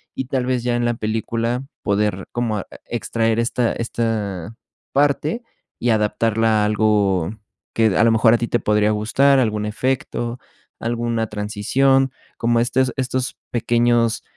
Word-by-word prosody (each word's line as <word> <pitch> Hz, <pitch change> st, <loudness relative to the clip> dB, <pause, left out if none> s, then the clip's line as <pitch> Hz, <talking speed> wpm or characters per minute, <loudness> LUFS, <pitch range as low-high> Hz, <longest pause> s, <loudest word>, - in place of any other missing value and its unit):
y 130 Hz, -, -3 dB
tal 130 Hz, -1 st, -1 dB
vez 125 Hz, -2 st, 0 dB
ya 120 Hz, -1 st, 0 dB
en 120 Hz, 0 st, 0 dB
la 120 Hz, -, +1 dB
película 115 Hz, +3 st, -2 dB, 0.2 s
poder 100 Hz, -2 st, 0 dB
como 115 Hz, -3 st, -1 dB
e -, -, -8 dB, 0.2 s
extraer 115 Hz, 0 st, 0 dB
esta 120 Hz, 0 st, +1 dB
esta 110 Hz, -4 st, -3 dB, 0.4 s
parte, 145 Hz, -, +1 dB, 0.4 s
y 120 Hz, -, 0 dB
adaptarla 110 Hz, 0 st, +2 dB
a -, -, +2 dB
algo 105 Hz, -4 st, +2 dB, 0.4 s
que 115 Hz, -1 st, +3 dB
a -, -, +5 dB
lo 115 Hz, -, +5 dB
mejor 115 Hz, 0 st, +5 dB
a -, -, +5 dB
ti 120 Hz, -, -2 dB
te 120 Hz, -, +1 dB
podría 105 Hz, -1 st, +2 dB
gustar, 130 Hz, +6 st, +3 dB
algún 105 Hz, -4 st, 0 dB
efecto, 120 Hz, +1 st, -2 dB, 0.4 s
alguna 115 Hz, -1 st, -1 dB
transición, 125 Hz, +6 st, +1 dB, 0.3 s
como 115 Hz, 0 st, +2 dB
estos 130 Hz, +1 st, +1 dB
estos 130 Hz, -1 st, -2 dB, 0.2 s
pequeños, 120 Hz, -1 st, +2 dB
115 Hz, 145 wpm, -21 LUFS, 105-125 Hz, 0.4 s, a